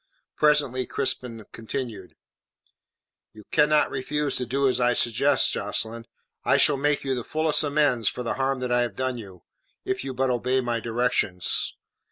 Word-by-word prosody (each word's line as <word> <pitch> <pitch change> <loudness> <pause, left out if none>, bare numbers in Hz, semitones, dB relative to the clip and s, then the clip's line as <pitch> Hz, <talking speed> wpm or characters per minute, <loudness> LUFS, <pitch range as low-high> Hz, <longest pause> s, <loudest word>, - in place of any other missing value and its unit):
Presently 145 -4 +2
Crispin 125 -5 -2
continued: 110 -4 -6 1.2
"You 110 - -13
cannot 150 0 +3
refuse 145 +2 -2
to 125 - -3
do 140 +2 +1
as 125 -1 +1
I 125 0 +3
suggest, 125 +4 +2
Jocelyn. 110 +3 -2 0.4
I - - +3
shall 145 - +5
make 145 +1 0
you 135 -1 -1
the 125 -2 -3
fullest 155 +3 +2
amends 145 -6 +1
for 125 - -6
the 115 - -2
harm 135 -1 -1
that 125 -1 -2
I 120 0 +3
have 120 -5 -2
done 130 0 -2
you, 95 -5 -12 0.4
if 130 - -2
you 135 -1 -5
but 130 0 +1
obey 125 +2 0
my 120 -2 -1
directions. 115 -6 0
125 Hz, 165 wpm, -25 LUFS, 115-140 Hz, 1.2 s, shall